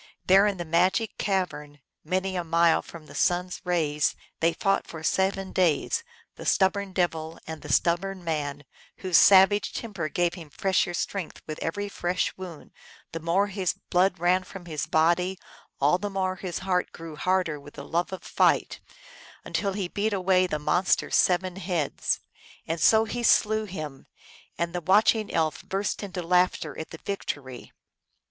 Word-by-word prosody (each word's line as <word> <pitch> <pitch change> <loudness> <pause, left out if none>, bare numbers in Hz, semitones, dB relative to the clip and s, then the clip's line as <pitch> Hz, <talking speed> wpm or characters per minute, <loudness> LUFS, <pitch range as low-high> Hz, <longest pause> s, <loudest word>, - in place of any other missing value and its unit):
There, 195 +2 +6
in 200 -2 -1
the 175 - -4
magic 185 +7 +1
cavern, 180 -7 -2 0.2
many 185 +3 -1
a 175 - -1
mile 165 0 +3
from 165 -2 -12
the - - -13
sun 175 0 +2
s 180 - -8
rays, 155 -5 +1 0.2
they 165 +1 +3
fought 195 +3 0
for 160 -1 -9
seven 190 +2 0
days, 180 - +1 0.3
the - - -8
stubborn 200 0 +2
devil 165 -3 -1
and 160 -1 -7
the - - -6
stubborn 185 +2 +1
man, 145 -3 -3 0.4
whose 185 -2 +1
savage 195 +1 +6
temper 195 -9 -4
gave 175 +2 0
him 165 -4 -10
fresher 185 +2 0
strength 190 0 -4
with 155 -1 -6
every 205 +5 -2
fresh 180 -2 -1
wound; 180 -5 -9 0.4
the 165 - -4
more 170 +5 +2
his 190 -3 -2 0.2
blood 185 +1 +3
ran 180 +2 +2
from 185 -1 -10
his 155 -3 -4
body 175 +4 +2 0.4
all 150 +6 +3
the 205 +1 -3
more 190 -1 -1
his 180 -1 -4
heart 180 -1 0
grew 165 -2 -9
harder 180 -2 0
with 145 +1 -14
the 140 - -8
love 170 +2 -1
of 190 - -6
fight, - - +2 0.7
until 200 -2 -1
he 195 -2 -2
beat 205 +3 -1
away 185 -1 +3
the 155 - -2
monster 155 +5 +1
s - - 0
seven 185 0 +2
heads. 175 -6 -1 0.4
And 165 0 -3
so 220 0 +5
he 240 +2 -4
slew 215 -2 +3
him, 155 -8 -7 0.5
and 170 0 -2
the 175 - -2
watching 210 +4 +3
elf 160 -2 0
burst 195 +2 -2
into 190 -3 -5
laughter 180 -3 +1
at 160 - -6
the 165 - -9
victory. 140 -10 -5
180 Hz, 170 wpm, -26 LUFS, 165-195 Hz, 0.7 s, There